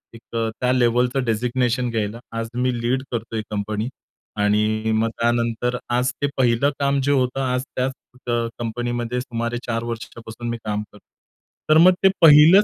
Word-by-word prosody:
एक 115 - -12 0.2
अ, 115 0 0
त्या 125 0 +1
लेव्हलचं 125 +1 +2
डेझिग्नेशन 120 +2 0
घ्यायला. 110 -1 -2 0.2
आज 115 0 -2
मी 125 0 0
लीड 130 +3 0
करतोय 115 -1 -3
कंपनी. 105 +2 -2 0.5
आणि 105 +1 +1
मग 115 +1 +1
त्यानंतर 120 +1 0 0.2
आज 125 +1 +2
ते 145 - +2
पहिलं 125 +2 +3
काम 140 0 +2
जे 145 - +2
होतं, 130 -1 +1
आज 125 -1 0
त्याच 130 +1 0 0.4
अ, 120 - 0 0.3
कंपनीमध्ये 120 +1 -2
सुमारे 115 -1 -3
4 115 -1 -2
वर्षापासून 115 0 -7
मी 115 - -2
काम 105 -1 -2
करतो 105 - -18 0.7
तर 155 - +6
मग 180 +3 +7
ते 195 - +7
पहिलंच 160 +5 +8
120 Hz, 160 wpm, -22 LUFS, 115-125 Hz, 0.7 s, पहिलंच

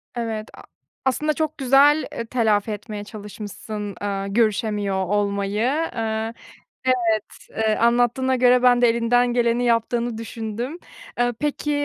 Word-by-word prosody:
Evet, 225 -2 -3
a - - -12 0.4
aslında 300 +4 +1
çok 310 +1 -2
güzel, 280 +3 +4
eee, 235 - -5
telafi 220 -3 +1
etmeye 210 0 -6
çalışmışsın, 210 -1 -7
aaa, 195 -1 -2
görüşemiyor 205 -2 0
olmayı. 200 0 -1 0.4
Eee, 225 0 -2 0.5
evet, 255 0 +4 0.5
eee, 220 -1 0
anlattığına 245 +2 +2
göre 250 0 +4
ben 245 -1 +5
de 240 - +6
elinden 240 +1 +2
geleni 240 0 +2
yaptığını 235 0 0
düşündüm. 230 +6 -5 0.4
Eee, 245 0 +2
peki, 295 0 -1
230 Hz, 125 wpm, -22 LUFS, 210-245 Hz, 0.5 s, de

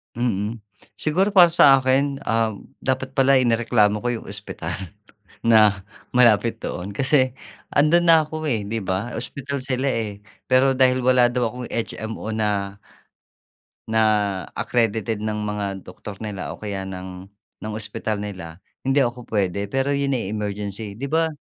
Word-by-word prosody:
Mm. 115 -2 -1 0.4
Siguro 180 +6 +1
para 180 -3 +8
sa 140 -5 +7
akin, 135 +2 +1
ah, 115 -1 +2 0.3
dapat 130 0 -1
pala 135 0 +5
inireklamo 115 -3 +2
ko - - -1
yung - - -14
ospital 95 -4 -6 0.7
na 105 -4 +5 0.3
malapit 115 -2 +4
doon 90 -2 -5
kasi 130 +4 +2 0.4
andoon 155 +4 +4
na 165 - +9
ako, 155 0 -4
eh, 110 -5 -1
'di 115 +2 -3
ba? 95 +6 -2
Ospital 140 +4 -4
sila, 130 0 -1
eh. 105 -3 -3 0.3
Pero 130 +1 +5
dahil 130 -1 +4
wala 125 -1 +5
daw 120 -1 0
akong 125 0 -7
HMO 110 -1 -4
na 100 -2 -1 1.1
na 110 0 +1 0.6
accredited 115 -2 0
ng 110 0 -2
mga 100 -2 -3
doktor 100 +3 -9
nila 100 -3 -5
o - - -20
kaya 100 -2 -4
ng 95 0 -8 0.3
ng 110 0 -5
ospital 110 0 -3
nila, 90 -5 -7 0.2
hindi 135 +1 +2
ako 120 0 -4
pwede, 100 -1 -1
pero 135 +4 0
yun 140 -1 0
ay 100 -4 -4
emergency. 105 0 -4
'Di 135 - -4
ba, 165 +1 +3
115 Hz, 150 wpm, -22 LUFS, 105-130 Hz, 1.1 s, na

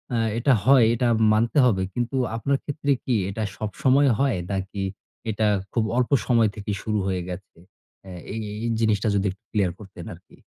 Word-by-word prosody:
আ - - +1 0.2
এটা 130 +2 +3
হয়। 130 -3 +6
এটা 125 +1 +1 0.3
মানতে 115 +6 +1
হবে। 95 -6 +2
কিন্তু 120 +2 -2 0.2
আপনার 135 +5 0
ক্ষেত্রে 145 -1 -2
কি 125 - 0
এটা 110 +3 -3
সবসময় 130 +6 +2
হয় 135 -7 +2
নাকি 95 0 -3 0.5
এটা 110 0 +1 0.3
খুব 115 - +1
অল্প 125 +2 +1
সময় 115 -3 +3
থেকেই 105 -1 -4
শুরু 105 -2 -1
হয়ে 95 -2 -1
গেছে? 95 +1 -9 0.5
এ - - -8 0.2
এই 115 - -3 0.2
এই - - 0
জিনিসটা 110 -1 +1
যদি 100 - +1
একটু 100 +4 -16
ক্লিয়ার 100 -5 +1
করতেন 95 -3 -11
আরকি। - - -17
110 Hz, 175 wpm, -24 LUFS, 100-125 Hz, 0.5 s, হয়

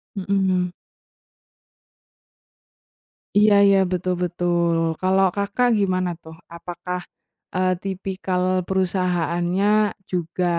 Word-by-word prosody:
Mhm 195 -2 -5
mhm. 185 -2 +1 2.6
Iya 210 0 +6
iya 195 -1 +5
betul 180 0 0
betul. 175 -1 0 0.2
Kalau 190 +1 +3
Kakak 200 +5 +1
gimana 185 -2 0
tuh, 160 0 -12 0.2
apakah, 180 +1 -6 0.6
eee, 185 0 +2
tipikal 190 -1 -3 0.2
perusahaannya 185 +2 +1 0.2
juga 180 0 -2
185 Hz, 85 wpm, -22 LUFS, 175-195 Hz, 2.6 s, Iya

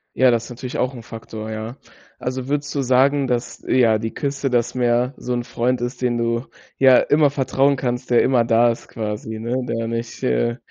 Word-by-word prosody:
Ja, 130 0 +5
das 120 -1 +2
ist - - -11
natürlich 125 +1 -6
auch 125 +1 0
'n 120 - -8
Faktor, 110 -1 -8
ja. 110 +2 -5 0.4
Also, 130 0 -4
würdest 145 0 -2
du 140 - +1
sagen, 135 +2 +3
dass, 120 -1 -3
ja, 115 -4 +4
die 110 +1 -4
Küste, 140 -1 -2
das 120 0 0
Meer 125 +1 +1
so 125 - -4
'n 120 0 -1
Freund 120 +1 -1
ist, 120 +1 -4
den 120 -1 +1
du 115 +1 -1 0.3
ja 130 -2 +7
immer 145 -1 +3
vertrauen 140 0 +1
kannst, 125 0 -3
der 120 - +5
immer 125 -3 +3
da 115 +1 +4
ist 115 - -8
quasi, 110 0 -5
ne, 125 +3 -2
der 115 -1 -2
nicht, 115 0 -5
äh, 65 - 0
120 Hz, 205 wpm, -21 LUFS, 115-130 Hz, 0.4 s, ja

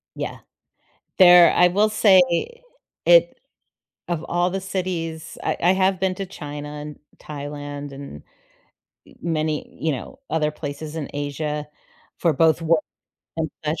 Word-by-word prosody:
Yeah. - - -5 0.8
There 175 -3 +8
I 180 - +5
will 205 +4 +2
say 205 -3 +5 0.9
it - - +5 0.7
of 170 -2 -2
all 175 +1 +1
the 195 +1 -3
cities 175 -4 -4
I - - 0
I 180 - +5
have 190 -1 +1
been 190 -1 0
to 195 - -4
China 145 -5 -7
and 150 -1 -9 0.2
Thailand 145 -1 -7
and, 135 - -9 0.9
eh, - - -17
many, 155 -2 -1
you 160 - 0
know, 200 - -8
other 155 -2 0
places 150 +1 -7
in 150 -4 -4
Asia 150 +1 -3 0.5
for 165 -3 +2
both 160 +3 +3
work 165 -1 +2 0.5
and 160 -1 -2
such. 155 +1 -1
160 Hz, 140 wpm, -22 LUFS, 150-180 Hz, 0.9 s, There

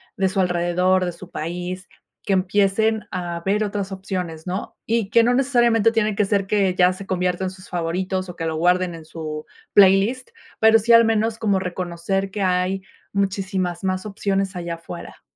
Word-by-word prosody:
de 190 -1 +1
su 190 - -2
alrededor, 180 +1 +2
de 180 - -1
su 175 +1 -12
país, 180 +3 -5 0.3
que 200 - 0
empiecen 200 +3 +2
a 175 -2 -4
ver 205 +3 +1
otras 200 -1 -3
opciones, 185 -4 -5
¿no?, 185 +3 -4
y 225 -3 0
que 230 +2 +5
no 245 +2 +3
necesariamente, 240 -4 +3
tiene 215 -2 +1
que 210 - +2
ser 195 -1 +1
que 195 -2 +1
ya 180 0 +4
se 195 +1 -10
conviertan 180 0 -1
sus 185 0 -13
favoritos, 185 +2 -2
o 175 - -8
que 165 - -4
lo 160 -1 -2
guarden 180 +1 +2
en 165 -1 -10
su 155 -1 -6 0.3
playlist, 205 +6 +4 0.3
pero 220 0 +6
sí, 230 +2 +3
al 230 0 +8
menos 225 0 +1
como 205 -3 +2
reconocer 185 +1 -2
que 200 +1 -3
hay, 185 +1 0 0.3
muchísimas 190 -2 -1
más 185 0 -1
opciones 195 -2 -1
allá 170 -1 -4
afuera. 165 - -10
190 Hz, 180 wpm, -22 LUFS, 180-205 Hz, 0.3 s, al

